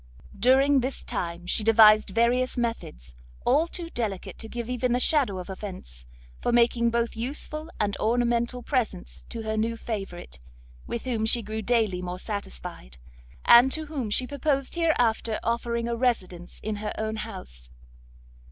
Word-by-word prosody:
During 265 Hz, +6 st, +4 dB
this 260 Hz, +2 st, -3 dB
time 170 Hz, 0 st, -4 dB
she 200 Hz, +4 st, +1 dB
devised 215 Hz, -1 st, +6 dB
various 240 Hz, +5 st, +1 dB
methods, 70 Hz, -, -4 dB, 0.3 s
all 295 Hz, +6 st, +3 dB
too 340 Hz, -1 st, -6 dB
delicate 210 Hz, -6 st, -4 dB
to 225 Hz, -, -7 dB
give 235 Hz, -1 st, -5 dB
even 250 Hz, 0 st, 0 dB
the 245 Hz, -, +2 dB
shadow 255 Hz, -8 st, +3 dB
of 180 Hz, -, -6 dB
offence, 185 Hz, -, -8 dB, 0.3 s
for -, -, 0 dB
making 235 Hz, 0 st, +3 dB
both 235 Hz, 0 st, -1 dB
useful 300 Hz, +6 st, -3 dB
and 205 Hz, -1 st, 0 dB
ornamental 235 Hz, +1 st, 0 dB
presents 230 Hz, -9 st, -3 dB
to 230 Hz, -1 st, -5 dB
her 220 Hz, 0 st, -2 dB
new 225 Hz, +1 st, -1 dB
favourite, 195 Hz, -, -6 dB, 0.5 s
with 235 Hz, -, -4 dB
whom 230 Hz, -4 st, -1 dB
she 235 Hz, +1 st, +3 dB
grew 215 Hz, +1 st, -4 dB
daily 220 Hz, -5 st, +1 dB
more 180 Hz, 0 st, -4 dB
satisfied, 65 Hz, -, -6 dB, 0.5 s
and 245 Hz, +3 st, +8 dB
to 315 Hz, 0 st, -3 dB
whom 280 Hz, -7 st, -4 dB
she 250 Hz, +5 st, +2 dB
purposed 275 Hz, 0 st, -1 dB
hereafter 245 Hz, -10 st, +1 dB
offering 235 Hz, 0 st, -1 dB
a 235 Hz, -, -1 dB
residence 190 Hz, -8 st, -2 dB
in 215 Hz, 0 st, -2 dB
her 210 Hz, +1 st, -4 dB
own 220 Hz, 0 st, -2 dB
house. 185 Hz, -, -8 dB
230 Hz, 155 wpm, -26 LUFS, 205-250 Hz, 0.5 s, and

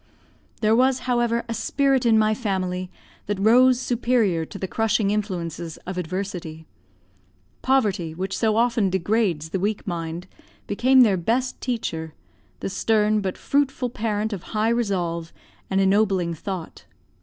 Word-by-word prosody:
There 215 Hz, 0 st, +4 dB
was, 260 Hz, +1 st, +3 dB
however, 240 Hz, -2 st, +1 dB
a 230 Hz, -, -3 dB
spirit 265 Hz, +2 st, +1 dB
in 225 Hz, -1 st, +5 dB
my 215 Hz, 0 st, +3 dB
family 185 Hz, -5 st, -2 dB, 0.4 s
that 205 Hz, -1 st, -1 dB
rose 245 Hz, +5 st, +5 dB
superior 235 Hz, -9 st, +1 dB
to -, -, -9 dB
the 190 Hz, -, -4 dB
crushing 220 Hz, -1 st, +1 dB
influences 175 Hz, -6 st, -3 dB
of 185 Hz, -, -5 dB
adversity. 180 Hz, -3 st, -5 dB, 1.0 s
Poverty, 200 Hz, -11 st, +1 dB
which 190 Hz, +2 st, -3 dB
so 220 Hz, -2 st, +1 dB
often 230 Hz, -3 st, +2 dB
degrades 185 Hz, -4 st, 0 dB
the 190 Hz, -, -2 dB
weak 205 Hz, +2 st, -2 dB
mind, 170 Hz, -1 st, -4 dB, 0.4 s
became 255 Hz, +5 st, +4 dB
their 210 Hz, -6 st, +4 dB
best 245 Hz, +8 st, -1 dB
teacher, 165 Hz, -10 st, -3 dB, 0.5 s
the -, -, -2 dB
stern 215 Hz, +1 st, +2 dB
but 190 Hz, -2 st, -3 dB
fruitful 270 Hz, -3 st, 0 dB
parent 215 Hz, -1 st, -2 dB
of 195 Hz, -, -5 dB, 0.2 s
high 215 Hz, +1 st, +2 dB
resolve 180 Hz, -8 st, -1 dB, 0.4 s
and 190 Hz, -, +1 dB
ennobling 195 Hz, -3 st, +2 dB
thought. 180 Hz, +1 st, -7 dB
205 Hz, 140 wpm, -23 LUFS, 180-235 Hz, 1.0 s, in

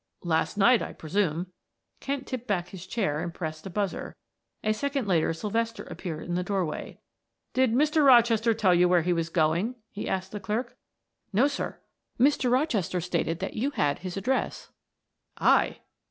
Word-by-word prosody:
"Last 165 Hz, +2 st, 0 dB
night, 235 Hz, +4 st, +5 dB
I -, -, -5 dB
presume." 175 Hz, +1 st, -1 dB, 0.5 s
Kent 275 Hz, -1 st, -3 dB
tipped 250 Hz, -2 st, -5 dB
back 180 Hz, -4 st, -1 dB
his 185 Hz, -1 st, -9 dB
chair 185 Hz, -9 st, -1 dB
and 170 Hz, +1 st, -3 dB
pressed 160 Hz, 0 st, -6 dB
a -, -, -6 dB
buzzer; 200 Hz, +1 st, -3 dB, 0.5 s
a 215 Hz, -, +2 dB
second 275 Hz, 0 st, -2 dB
later 170 Hz, -5 st, +2 dB
Sylvester 225 Hz, +6 st, -2 dB
appeared 160 Hz, -4 st, -6 dB
in 175 Hz, -, -2 dB
the 180 Hz, -, +1 dB
doorway. 180 Hz, -4 st, -3 dB, 0.5 s
"Did 255 Hz, -3 st, +3 dB
Mr. 300 Hz, +4 st, +3 dB
Rochester 235 Hz, -3 st, +5 dB
tell 195 Hz, -4 st, +3 dB
you 175 Hz, 0 st, +4 dB
where 175 Hz, -2 st, +4 dB
he 175 Hz, +1 st, +2 dB
was 165 Hz, -1 st, -1 dB
going?" 170 Hz, +8 st, +1 dB, 0.2 s
he 205 Hz, -, -5 dB
asked 190 Hz, 0 st, -2 dB
the 210 Hz, -, -5 dB
clerk. 215 Hz, +5 st, -3 dB, 0.6 s
"No, 220 Hz, +6 st, +4 dB
sir. 290 Hz, -, -4 dB, 0.4 s
Mr. 265 Hz, -1 st, +3 dB
Rochester 245 Hz, -, +1 dB
stated 170 Hz, -1 st, -1 dB
that 190 Hz, -, -3 dB
you 250 Hz, +6 st, 0 dB
had 145 Hz, -, 0 dB
his 185 Hz, 0 st, -6 dB
address. 255 Hz, +7 st, -2 dB, 0.7 s
"I?" -, -, +3 dB
195 Hz, 170 wpm, -27 LUFS, 175-240 Hz, 0.7 s, night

